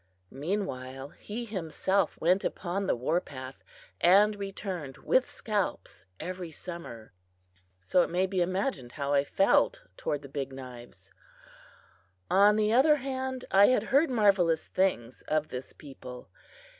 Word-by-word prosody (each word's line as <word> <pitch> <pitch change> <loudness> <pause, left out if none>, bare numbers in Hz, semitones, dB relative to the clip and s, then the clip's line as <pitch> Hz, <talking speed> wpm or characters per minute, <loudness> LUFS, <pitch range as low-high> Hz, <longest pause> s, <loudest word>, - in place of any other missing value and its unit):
Meanwhile, 135 -5 -4
he 225 +9 -7
himself 190 -1 -1
went 180 +4 +2
upon 190 +2 -2
the - - +2
war 145 +9 0
path 130 -3 -10 0.4
and 205 +4 +5
returned 190 -8 -5
with 260 0 +2
scalps 200 - -3
every 185 -1 -5
summer. 155 - -9 0.6
So 90 - +2
it - - 0
may 180 +2 +1
be 190 -1 -1
imagined 185 - -2
how 140 -1 -2
I 140 -1 +4
felt 195 +7 +2
toward 145 -1 -3
the - - -8
Big 135 -1 -5
Knives! 120 -7 -11 1.2
On 205 +2 +6
the 215 0 +2
other 290 +5 +6
hand, 260 -2 -4
I 195 +1 +7
had 255 - +3
heard 285 +3 +5
marvelous 195 -9 +3
things 130 -11 -1
of 155 0 0
this 125 +1 -6
people. 130 -3 -11
180 Hz, 135 wpm, -29 LUFS, 135-205 Hz, 1.2 s, I